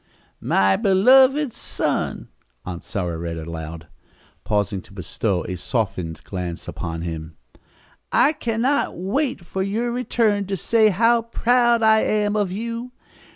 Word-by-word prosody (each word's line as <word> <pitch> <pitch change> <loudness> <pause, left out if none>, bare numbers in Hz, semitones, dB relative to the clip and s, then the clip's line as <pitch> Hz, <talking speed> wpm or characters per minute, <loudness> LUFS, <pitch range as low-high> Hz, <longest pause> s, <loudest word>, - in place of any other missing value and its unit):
"'My 95 0 +2
beloved 260 +7 +5
son,'" - - -2 0.4
Aunt 90 -2 -6
Sarah 90 -6 -3
read 85 -1 -4
aloud, 80 0 -7 0.6
pausing 100 -2 -1
to 100 - -18
bestow 95 +1 -2
a 90 - -4
softened 90 - -3
glance 90 -3 -5
upon 85 -1 -5
him. 80 -2 -6 0.7
"'I 295 - +4
can 230 -6 -2
not 280 +2 +1
wait 255 - -1
for 190 - -3
your 220 +5 -1
return 225 -5 0
to 195 -1 -2
say 220 +3 +3
how 230 +4 +3
proud 235 0 +2
I 220 0 +6
am 210 -1 +1
of 205 -3 0
you. 230 +4 -5
195 Hz, 135 wpm, -22 LUFS, -, 0.7 s, I